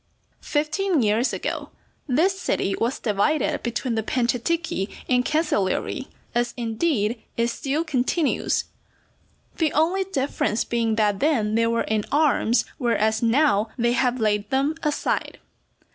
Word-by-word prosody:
Fifteen 310 - 0
years 220 +4 +2
ago - - -4 0.4
this 350 +9 +2
city 195 - 0
was 235 +3 -1
divided 235 +7 0
between 240 +1 -2
the 220 - 0
Panciatichi 245 - -1 0.2
and 250 -1 +3
Cancellieri, 270 - 0 0.3
as 240 0 0
indeed 230 -1 0 0.2
it 235 0 +2
still 280 +6 -1
continues, 295 +1 0 0.9
the 315 -3 +1
only 345 +6 +2
difference 275 - -1
being 230 -2 0
that 210 -2 +1
then 235 -9 +1
they 230 +1 +3
were 230 0 +1
in 215 -1 0
arms, 285 -5 +3
whereas, 220 -3 +1
now, 230 -3 +3
they 235 -1 +2
have 250 0 +1
laid 210 -2 0
them 275 +3 +1
aside. 300 -2 -1
245 Hz, 130 wpm, -24 LUFS, 220-300 Hz, 0.9 s, and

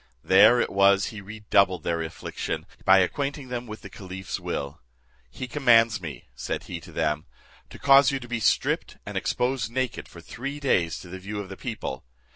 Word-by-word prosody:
There 120 - +7
it - - 0
was 100 +1 +4
he 110 -3 -8
redoubled 100 -4 +1
their 85 -1 -1
affliction, 80 0 -5 0.2
by 95 +1 +7
acquainting 140 - -1
them 125 -1 -4
with 110 0 -9
the - - -8
caliph's 95 -1 -6
will. 70 0 -4 0.5
"He 130 - -6
commands 115 -5 +4
me," 75 -8 -7
said 65 +1 -4
he - - -6
to - - -13
them, 75 -1 -1 0.4
"to - - -11
cause 135 0 +6
you 135 - -1
to 120 - -10
be 120 -1 -2
stripped, 110 - +1
and - - -7
exposed 125 -2 0
naked 130 +1 -2
for - - -13
three 135 +4 -6
days 90 - +1
to - - -11
the 95 +2 -8
view 105 +2 -5
of 100 -2 -6
the 95 - -7
people. 110 - -5
105 Hz, 190 wpm, -26 LUFS, 90-125 Hz, 0.5 s, There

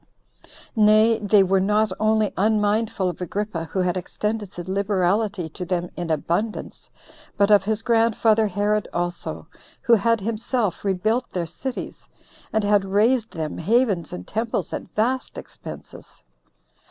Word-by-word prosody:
Nay, 215 +1 +5
they 205 -1 +4
were 190 +1 +2
not 210 +2 +2
only 215 -1 +2
unmindful 210 0 +1
of 180 0 -4
Agrippa, 185 -1 -3
who 190 +3 -2
had 180 0 0
extended 210 +2 -3
his 175 -2 -8
liberality 195 -1 0
to 170 - -6
them 175 -1 -2
in 175 -1 -4
abundance, 170 +8 -2 0.5
but 200 +1 +3
of 200 -2 +5
his 220 +1 +1
grandfather 225 -1 +3
Herod 205 +2 0
also, 175 0 -3 0.4
who 235 - +4
had 230 +1 +3
himself 220 0 -2
rebuilt 215 +6 0
their 175 -2 -3
cities, 255 +10 -6 0.4
and 220 -1 +1
had 205 -1 +3
raised 220 +4 +2
them 160 -2 -4
havens 200 -2 +1
and 90 - -7
temples 225 +2 -2
at - - -5
vast 250 +4 0
expenses. - - -10
210 Hz, 140 wpm, -23 LUFS, 185-220 Hz, 0.5 s, Nay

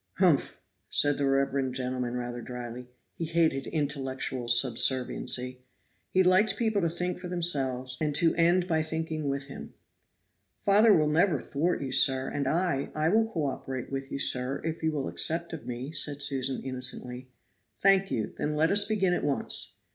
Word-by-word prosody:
"Humph!" - - +1 0.3
said 145 -1 +2
the 140 - +1
reverend 135 -1 0
gentleman 125 -1 -3
rather 120 0 -5
dryly; 125 0 -8 0.3
he 165 - -5
hated 160 -4 0
intellectual 135 -4 -3
subserviency. 125 +1 +2 0.5
He 185 - +3
liked 195 +3 +3
people 220 -3 0
to 170 - +1
think 180 +2 -3
for 180 - -7
them 175 -1 -3
selves; 130 -5 0
and 150 -2 -1
to 165 +1 +4
end 175 +2 +2
by 160 -3 +1
thinking 160 -1 -3
with 140 0 -3
him. 140 - -11 0.8
"Father 210 +3 +4
will 155 -6 +4
never 155 0 +2
thwart 150 +4 -2
you, 135 - -5
sir, 130 0 +4
and 140 -2 -3
I 170 -3 -1
I 155 +1 +1
will 225 +3 +2
co 160 -7 -2
operate 130 -2 -5
with 135 0 -5
you, - - -3
sir, 130 0 +2
if 160 0 -4
you 160 0 0
will 145 -3 -3
accept 170 +1 +1
of 160 - -8
me," 125 +3 -5
said 145 -3 0
Susan 135 -2 +1
innocently. 125 -1 -3 0.5
"Thank 195 0 +3
you, 110 - -3
then 150 0 -3
let 160 +2 +2
us 205 0 +5
begin 195 -4 +1
at - - -2
once." 145 -2 -1
145 Hz, 175 wpm, -28 LUFS, 130-170 Hz, 0.8 s, us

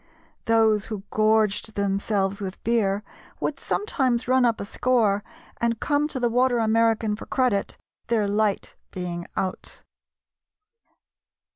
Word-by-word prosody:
Those 220 -3 +3
who 215 -3 -6
gorged 215 0 +2
themselves 200 0 0
with 190 -1 -6
beer 210 -3 +1 0.4
would - - -2
sometimes 260 - 0
run 255 0 +4
up 230 -2 +1
a - - -4
score 215 -3 +1 0.3
and 235 -1 0
come 290 0 +1
to 275 - -4
the 245 - +2
Water 245 +1 +2
American 225 -1 +2
for - - -10
credit, 250 -7 0 0.3
"their 220 -3 +1
light 205 0 0 0.2
being 175 -1 -5
out." 185 -1 -4
220 Hz, 125 wpm, -24 LUFS, 200-235 Hz, 0.4 s, run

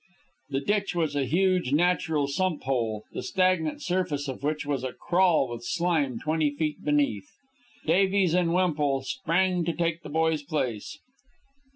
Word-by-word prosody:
The 135 -1 -1
ditch 205 +3 0
was 160 -4 0
a 140 -2 +1
huge 180 -1 +1
natural 160 -2 +2
sump 170 +3 -1
hole, 115 -5 -1
the - - -4
stagnant 185 -4 0
surface 175 -6 -1
of 130 - -5
which 150 +1 -2
was 140 -3 -2
a 130 -1 -3
crawl 175 -6 +2
with 120 -1 -7
slime 160 -4 0
twenty 155 -1 +1
feet 150 +1 -3
beneath. 145 -10 0 0.6
Davies 190 +1 +3
and 175 -2 +2
Wemple 150 -7 +1
sprang 175 +7 0
to 170 0 -1
take 170 0 -1
the - - -9
boy's 160 0 +1
place. 140 -3 -3
155 Hz, 155 wpm, -27 LUFS, 140-180 Hz, 0.6 s, Davies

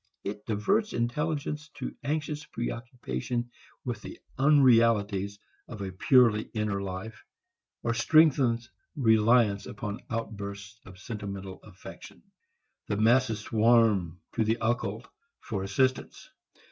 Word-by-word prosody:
It 105 +1 -6
diverts 195 - +1
intelligence 150 +5 -2
to - - -6
anxious 150 0 -2
preoccupation 120 - -4 0.3
with - - -4
the - - -9 0.2
unrealities 115 -8 +4 0.3
of 105 -4 -7
a 95 - -4
purely 110 +2 +4
inner 105 -2 -1
life, 100 +3 -6 0.6
or 115 - +1
strengthens 125 -3 +3 0.2
reliance 110 -4 +3
upon 105 0 -6
outbursts 100 -2 -6
of 95 -1 -12
sentimental 100 -2 -7
affection. 100 -4 -13 0.6
The 100 - -1
masses 115 0 +3
swarm 110 -6 +3
to - - +1
the 110 +2 +1
occult 115 +1 -2 0.3
for 105 -5 -4
assistance. 130 +7 -1
110 Hz, 110 wpm, -28 LUFS, 100-125 Hz, 0.6 s, unrealities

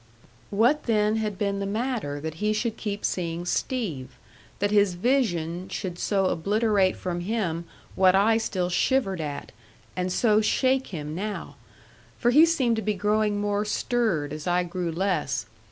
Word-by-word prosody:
What 240 +9 +2
then 215 -1 +2
had 210 -3 -2
been 200 0 -1
the 200 - -2
matter 215 - -2
that 160 0 -4
he 210 0 +2
should 225 +1 -1
keep 205 -2 -4
seeing 170 -1 -2
Steve 160 - -2 0.4
that 205 +1 0
his 205 -3 +3
vision 180 -6 0
should 180 -3 -5
so 195 -2 +1
obliterate 200 +2 +2
from 175 -1 -3
him 175 -4 -2 0.3
what 185 0 +4
I 220 +3 +4
still 185 -5 -1
shivered 195 -3 +1
at, 145 -2 -5 0.4
and 180 0 -1
so 215 +2 +3
shake 260 +4 +2
him 150 -4 -6
now? 205 +5 -5 0.6
For 240 - +2
he 310 +6 +7
seemed 260 -9 +1
to - - -1
be 210 0 -1
growing 210 +1 +1
more 205 0 0
stirred 210 - 0
as 155 +1 -6
I 180 0 +2
grew 175 -1 -3
less. 165 - -1
200 Hz, 160 wpm, -26 LUFS, 175-220 Hz, 0.6 s, he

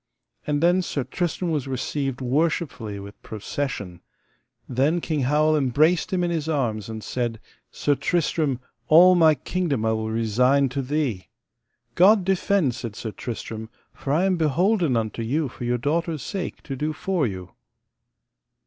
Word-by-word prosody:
And 150 +1 0
then 175 +2 +4
Sir 145 -6 -2
Tristram 175 +5 -2
was 145 -4 -1
received 135 0 -3
worshipfully 130 - -1
with 100 +1 -11
procession. 105 -4 -5 0.7
Then 140 +7 +1
King 160 -2 -2
Howel 155 +3 +3
embraced 150 +5 +2
him 180 -2 +1
in 175 - 0
his 160 -2 -2
arms, 115 -9 -1
and 110 -1 -6
said: 120 -3 -2 0.3
Sir 145 - 0
Tristram, 150 -4 0 0.3
all 175 +5 +8
my 160 -3 +5
kingdom 145 -5 -2
I 110 - +2
will 110 0 -2
resign 125 +5 +2
to 135 +2 -2
thee. 130 -8 -2 0.7
God 195 +1 +5
defend, 190 -6 +2
said 115 -3 -6
Sir 110 - -5
Tristram, 110 -1 -6 0.2
for 135 - -5
I 160 +5 +3
am 190 -2 +2
beholden 170 - +2
unto 110 0 -2
you 140 +7 0
for 120 -1 -7
your 120 +1 +1
daughter's 155 +3 -1
sake 195 -3 -5
to 135 - -5
do 150 +4 -2
for 170 -3 0
you. 95 -3 -7
140 Hz, 155 wpm, -24 LUFS, 120-165 Hz, 0.7 s, all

